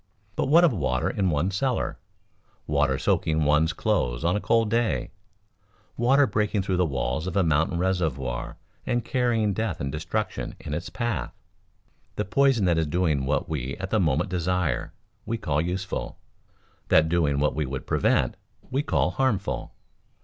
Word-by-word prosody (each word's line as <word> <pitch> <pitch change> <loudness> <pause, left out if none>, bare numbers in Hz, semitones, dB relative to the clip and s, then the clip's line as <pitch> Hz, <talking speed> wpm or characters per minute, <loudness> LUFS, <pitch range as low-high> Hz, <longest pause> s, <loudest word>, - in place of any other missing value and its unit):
But - - 0
what 165 +5 +6
of 165 -7 +5
water 65 - 0
in 95 -2 0
one's 85 +5 0
cellar, 130 +4 -1 0.7
water - - +1
soaking 80 0 +1
one's 75 +2 +3
clothes 80 - -1
on 85 - +2
a 105 - -1
cold 115 -2 +2
day, 115 0 0 0.8
water 135 +4 +4
breaking 105 -4 0
through 95 -1 0
the 90 -1 +2
walls 70 +3 -2
of 95 - -2
a 95 - +4
mountain 80 +2 +1
reservoir 75 -10 -1 0.3
and 120 -2 -1
carrying 120 -5 +1
death 105 -4 -2
and 70 -1 -3
destruction 90 +8 -3
in 75 -2 -6
its 85 +3 -4
path? 120 -4 -3 0.8
The 105 - -1
poison 135 0 +3
that 85 -2 +3
is 80 - 0
doing 75 -5 0
what 75 - 0
we 70 -4 -3
at 95 0 -5
the 110 - +3
moment 80 -6 +1
desire, 90 -6 -1 0.4
we 115 +1 -1
call 75 -7 0
useful; 90 +3 -3 0.7
that 80 0 +5
doing 80 -4 +1
what 75 +1 +2
we 75 -2 -2
would 65 0 -5
prevent, - - +1 0.3
we 135 +2 +1
call 145 - +1
harmful. 125 -8 -1
90 Hz, 165 wpm, -26 LUFS, 75-110 Hz, 0.8 s, what